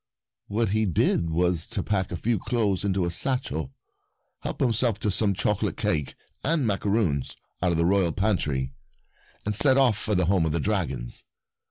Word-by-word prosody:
What 110 +1 0
he 110 0 +1
did 85 -1 +1
was 85 0 0
to 105 -5 -3
pack 95 -3 -1
a 90 - -3
few 115 +3 0
clothes 105 -6 0
into 95 -2 0
a 85 - -2
satchel, 85 - 0 0.7
help - - -5
himself 120 -2 +1
to 105 - +1
some 100 0 +2
chocolate 105 +1 -1
cake 75 -4 -1 0.3
and 155 -2 +1
macaroons 100 - 0 0.3
out 90 -1 +2
of - - 0
the 85 - +2
royal 95 -2 +3
pantry, 75 -10 -1 0.7
and 105 0 -1
set 130 +4 +5
off 130 -5 +4
for 105 - -1
the 90 -1 +2
home 90 -2 +2
of 75 - -1
the - - 0
dragons. 70 - -2
100 Hz, 175 wpm, -26 LUFS, 85-110 Hz, 0.7 s, set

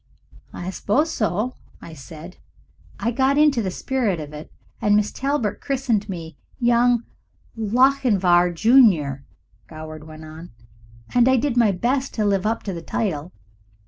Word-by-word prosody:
"I 180 +2 -6
suppose 290 - 0
so," 215 +3 -1 0.4
said 160 +4 -11 0.6
I. 235 - 0
"I - - -1
got 265 +3 +1
into 295 -5 +4
the 195 - -2
spirit 220 -2 -1
of 150 -1 -8
it, 150 +1 -10 0.3
and 205 -1 +3
Miss 210 0 +1
Talbert 270 -6 -2
christened 245 -7 -1
me 165 -4 -7 0.2
Young 240 0 +3 0.5
Lochinvar, 215 -6 +3
Junior," 170 - +3 0.4
Goward 155 -1 -9
went 155 0 -11
on, 155 -1 -11 0.6
"and 245 +1 +4
I 260 - +4
did 250 0 0
my 230 -4 +4
best 255 +8 -1
to 215 - 0
live 200 0 +1
up 225 +1 -2
to 195 - -4
the 170 - -6
title. 165 -3 -3
210 Hz, 145 wpm, -22 LUFS, 170-245 Hz, 0.6 s, into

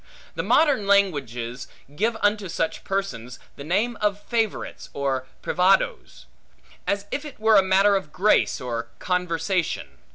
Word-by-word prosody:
The - - -2
modern 280 -10 +3
languages 135 - 0 0.3
give 225 +6 0
unto 205 -2 +1
such 165 0 -2
persons 125 - -3 0.2
the 140 - -9
name 210 +9 0
of 205 -1 +1
favorites, 225 -1 -3
or 135 -2 -2 0.2
privadoes; 180 - +1 0.6
as 200 0 0
if 285 - -2
it 295 -6 -10
were 220 -2 +6
matter 195 +2 +4
of 190 -6 -3
grace, 205 +6 +2
or 115 -2 -4
conversation. 175 - -2
190 Hz, 130 wpm, -24 LUFS, 140-205 Hz, 0.6 s, were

